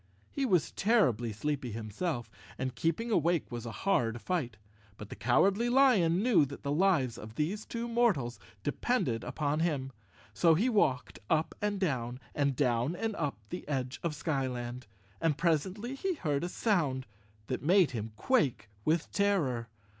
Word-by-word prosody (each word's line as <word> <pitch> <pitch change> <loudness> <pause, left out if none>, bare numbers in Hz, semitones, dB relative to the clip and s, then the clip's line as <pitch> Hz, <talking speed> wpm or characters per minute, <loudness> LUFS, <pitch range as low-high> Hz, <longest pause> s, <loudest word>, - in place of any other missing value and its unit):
He 275 -2 -1
was 180 -8 +2
terribly 130 - +2
sleepy 130 +2 -3
himself 115 - -3 0.3
and 130 -1 -2
keeping 165 - -1
awake 170 -6 +1
was 120 -1 -5
a - - -4
hard 120 -12 +2
fight, 130 -9 -2 0.4
but 105 - -9
the - - -7
Cowardly 195 - +3
Lion 215 -9 +4
knew 220 -11 +5
that 140 0 -6
the 140 - -1
lives 150 -7 +2
of 110 +1 -10
these 185 - -2
two 235 0 -3
mortals 220 - +1 0.2
depended 145 - 0
upon 150 0 -1
him, 145 -6 0 0.4
so 165 -2 +4
he 220 +10 +2
walked 140 - +1
up 160 -1 +1
and 205 -1 0
down, 125 -8 -1
and 140 -2 +1
down 125 +3 +1
and 220 +3 -2
up 145 -6 -2
the 180 - -6
edge 130 -2 -2
of 170 -3 -1
the - - -9
Skyland, 125 -5 -3 0.3
and 155 -4 +2
presently 185 - 0
he 365 +7 -2
heard 150 - -1
a 175 - -2
sound 155 - 0 0.4
that 130 - -3
made 180 +2 +4
him 110 -2 -4
quake 120 - +1
with 160 +4 +1
terror. 150 - +1
150 Hz, 160 wpm, -31 LUFS, 125-195 Hz, 0.4 s, knew